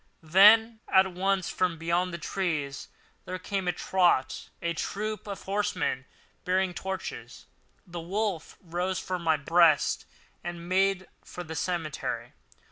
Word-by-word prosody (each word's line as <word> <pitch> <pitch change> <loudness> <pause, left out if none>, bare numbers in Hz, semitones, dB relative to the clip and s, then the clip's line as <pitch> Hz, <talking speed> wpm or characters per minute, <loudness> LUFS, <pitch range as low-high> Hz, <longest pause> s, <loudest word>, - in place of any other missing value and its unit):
Then 215 +7 +6
all - - -4
at 190 0 +6
once 190 0 0
from 180 -3 0
beyond 170 +3 0
the 170 - -4
trees 155 -6 -3 0.4
there 185 - -4
came 190 0 -3
at 175 - +1
a - - -18
trot 175 -8 +1
a 170 0 -1
troop 215 +6 -4
of 200 -1 -6
horsemen 195 -9 -1 0.4
bearing 185 0 +1
torches. 190 +1 -6 0.4
The 175 -2 -7
wolf 190 -1 -3
rose 180 +2 -2
from 185 -1 -3
my 160 -2 +2
breast 165 +1 +3 0.4
and 175 0 -6
made 190 0 +2 0.2
for 180 - -8
the 160 -1 -7
cemetery. 165 -3 -3
180 Hz, 140 wpm, -28 LUFS, 170-190 Hz, 0.4 s, Then